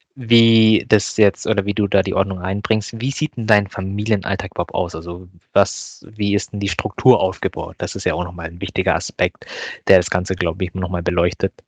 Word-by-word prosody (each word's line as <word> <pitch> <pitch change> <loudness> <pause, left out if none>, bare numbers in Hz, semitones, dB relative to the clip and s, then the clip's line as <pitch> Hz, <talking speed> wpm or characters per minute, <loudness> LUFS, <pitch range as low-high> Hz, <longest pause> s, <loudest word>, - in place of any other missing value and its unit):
wie 115 -3 +5
das 105 -1 +2
jetzt 105 -2 +3
oder 100 -3 0
wie 100 - -2
du 105 -2 +1
da 100 0 +3
die 95 0 -4
Ordnung 95 -1 0
reinbringst. 100 +4 -2
Wie 130 +4 -2
sieht 150 -2 -4
denn 115 - -4
dein 105 -2 +4
Familienalltag 100 +1 -3
überhaupt - - -4
aus? 85 -1 -2
Also, 85 +2 -9 0.3
was - - 0
wie 105 -2 -2
ist 100 - -1
denn 105 - -6
die 100 -1 -1
Struktur 130 +3 +3
aufgebaut? 95 -1 -3
Das - - -5
ist - - -7
ja - - +1
auch - - -2
noch 90 0 -9
mal 85 -2 -7
'n 85 +1 -15
wichtiger - - 0
Aspekt, - - -3 0.4
der 95 - +8
das 90 - 0
Ganze, 90 +1 -1
glaube 85 0 -2
ich, 90 - -10
noch 90 -2 -4
mal 90 -1 -3
beleuchtet. 90 0 0
100 Hz, 215 wpm, -19 LUFS, 90-110 Hz, 0.4 s, der